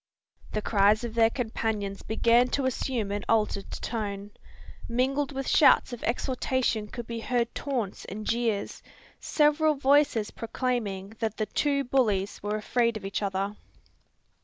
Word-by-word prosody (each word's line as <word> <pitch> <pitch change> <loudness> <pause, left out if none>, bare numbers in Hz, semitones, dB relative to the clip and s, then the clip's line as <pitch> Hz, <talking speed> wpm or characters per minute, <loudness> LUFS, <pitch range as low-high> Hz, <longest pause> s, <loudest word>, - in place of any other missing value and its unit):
The 215 - -1
cries 210 +1 +3
of 235 -2 -4
their 225 -1 +4
companions 220 -4 -3
began 235 +2 +3
to 275 - -1
assume 240 -4 -1
an 205 0 -2
altered 210 -3 +1
tone. 205 -3 -4 0.6
Mingled 265 +4 0
with 270 -1 -4
shouts 285 -3 +5
of 240 - -7
exhortation 250 -2 0
could 240 +2 -7
be 230 0 -5
heard 235 0 -1
taunts 245 -9 -3
and 210 +2 -7
jeers, 225 -3 -1 0.4
several 300 0 +3
voices 275 -5 +3
proclaiming 225 -5 -3
that 220 -2 -2
the 215 - 0
"two 280 +6 0
bullies 215 -7 0
were 205 +1 -2
afraid 230 +1 +1
of 200 - -9
each 195 - -2
other." 195 +1 -2
230 Hz, 140 wpm, -27 LUFS, 210-255 Hz, 0.6 s, shouts